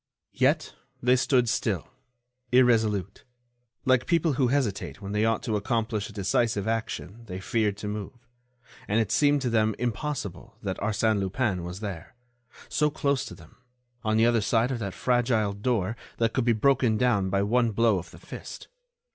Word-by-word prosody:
Yet, - - +1 0.3
they 125 +1 +5
stood 125 -1 +2
still, - - -1 0.6
irresolute. 110 -6 +2 0.6
Like 130 -1 +3
people 165 -2 +2
who 130 -1 +2
hesitate 120 -8 -1
when 100 -1 -7
they 105 +1 +1
ought 115 -1 +1
to 110 - -1
accomplish 110 0 -1
a - - -10
decisive 105 +1 0
action 115 -1 -3
they 90 -2 -5
feared 105 +1 0
to 105 - -6
move, 105 +4 -6 0.6
and 105 +3 +2
it 110 -2 0
seemed 145 +1 +3
to 125 - 0
them 110 -2 +2
impossible 120 - -4
that 95 -2 -2
Arsène 105 +1 +1
Lupin 95 -1 -1
was 90 +3 -6
there, 100 +2 -6 0.5
so 150 0 +1
close 140 -2 0
to - - -8
them, - - -17 0.5
on 110 0 +1
the 115 - +5
other 120 -1 +3
side 115 +4 +2
of 125 - -2
that 100 -4 -4
fragile 120 -4 +1
door 105 -1 -1 0.2
that 115 -1 +1
could 130 - 0
be 120 - +4
broken 120 -1 +3
down 105 -6 +2
by 100 +1 +1
one 120 +3 +2
blow 110 -2 +2
of 85 - -10
the - - -14
fist. - - -9
110 Hz, 170 wpm, -27 LUFS, 100-125 Hz, 0.6 s, they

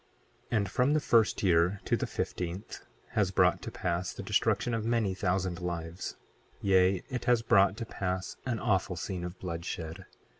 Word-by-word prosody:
28:10 115 - +3
And 100 -3 -1
from 130 +4 +3
the 155 - +4
first 115 -8 +3
year 90 +1 +3
to - - +2
the - - -2
fifteenth 90 +4 -4 0.3
has - - +1
brought - - +3
to - - -5
pass 90 0 -2
the - - -7
destruction 120 - +1
of 115 -1 -1
many 115 -4 +1
thousand 95 -2 -1
lives; 85 0 -4 0.4
yea, 95 -1 +3
it 125 - -3
has 120 -2 +3
brought 100 -2 +4
to 115 - -4
pass 95 -3 -3
an 120 -3 0
awful 95 -3 +1
scene 90 +1 -4
of 90 +1 -6
bloodshed. 85 0 -5
95 Hz, 175 wpm, -30 LUFS, 90-110 Hz, 0.4 s, the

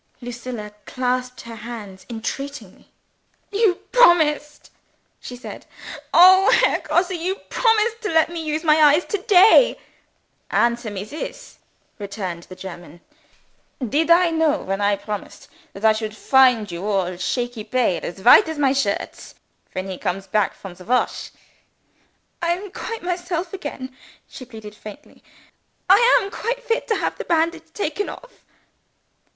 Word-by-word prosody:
Lucilla 240 -3 -7 0.2
clasped 255 0 -2
her 230 -1 -10
hands 215 -4 -9
entreatingly. 235 -1 -7 0.6
"You 410 -3 +2 0.2
promised!" 315 -10 +3 0.5
she 250 - -9
said. 245 - -10 0.4
"Oh, 375 +2 +7
Herr - - +3
Grosse, 360 +2 0
you 360 +2 -2
promised 450 +1 0
to 420 - -3
let 320 -1 +3
me 335 -2 -5
use 310 +1 -3
my 310 -1 +4
eyes 300 +3 +5
to 410 - -3
day!" 410 +5 +5 0.7
"Answer 235 -1 +1
me 200 -2 -5
this!" 310 - -8 0.4
retorted 195 -4 -6
the 185 - -12
German. 175 -3 -10 0.9
"Did 305 +8 0
I 340 0 +5
know, 320 -2 +1
when 195 +1 -3
I 205 0 +2
promised, 205 +1 -8 0.3
that 200 +3 -5
I 220 - +6
should 215 0 -5
find 250 -7 +3
you 170 +2 -6
all 190 -3 -1
shaky 240 +5 -3
pale, 230 -4 0
as 190 +2 -7
white 320 - +7
as 320 - -5
my 275 -2 +2
shirts 220 -8 -3 0.4
when 185 +1 -4
he 190 -1 -6
comes 195 +2 -3
back 210 0 0
from 195 -2 -10
the 180 +1 -14
wash?" 250 +2 -1 1.1
"I 340 0 +1
am 380 +2 -7
quite 455 +2 -6
myself 350 0 -3
again," 260 -8 -7 0.3
she 255 - -11
pleaded 220 -4 -11
faintly. 210 -1 -13 0.7
"I 385 +2 +7 0.2
am 395 -4 -6
quite - - -4
fit 460 -1 -1
to 440 - +1
have - - -3
the - - -5
bandage 335 0 -1
taken 405 +1 -3
off." - - -13
260 Hz, 145 wpm, -21 LUFS, 210-350 Hz, 1.1 s, Oh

